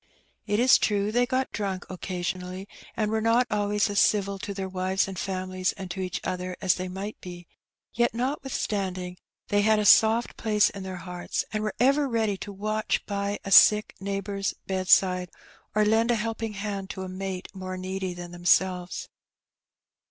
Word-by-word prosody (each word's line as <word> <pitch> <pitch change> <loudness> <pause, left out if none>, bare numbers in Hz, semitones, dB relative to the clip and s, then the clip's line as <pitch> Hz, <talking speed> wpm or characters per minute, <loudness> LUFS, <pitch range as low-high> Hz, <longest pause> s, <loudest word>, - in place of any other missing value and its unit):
It 205 - +1
is 255 +2 +6
true 205 0 +1
they 245 +2 +2
got 260 0 -1
drunk 195 -3 -3
occasionally, 185 +1 -5 0.3
and 215 -1 0
were 220 0 0
not 230 +3 +3
always 205 0 +1
as 205 -1 0
civil 200 -1 +2
to 200 - -5
their 195 -1 -4
wives 190 +1 0
and 190 -2 -6
families 185 0 -2
and 190 -2 -7
to 190 - -5
each 185 -1 -3
other 180 0 -4
as 185 -2 +3
they 185 0 -4
might 195 +3 -6
be; 175 -1 -9 0.5
yet, 240 0 +2
notwithstanding, 205 -9 -2 0.3
they 205 0 +3
had 215 +1 +4
a 210 - 0
soft 225 +3 +5
place 210 -2 +2
in 200 - -8
their 190 0 -5
hearts, 180 0 -4
and 215 - -1
were 215 0 -3
ever 275 +3 +3
ready 220 -4 +1
to 200 +2 -7
watch 215 +2 -1
by 200 0 -2
a 195 - -5
sick 210 +2 +7
neighbour's 195 0 -3
bed 185 -1 -3
side, 180 -1 +4 0.5
or 215 0 +4
lend 225 +2 +3
a 240 - +4
helping 225 0 -3
hand 200 -1 -4
to 190 - -5
a - - -5
mate 185 0 -5
more 185 -1 -6
needy 185 0 -4
than 175 0 -8
themselves. 180 +1 +1
195 Hz, 180 wpm, -26 LUFS, 185-215 Hz, 0.5 s, sick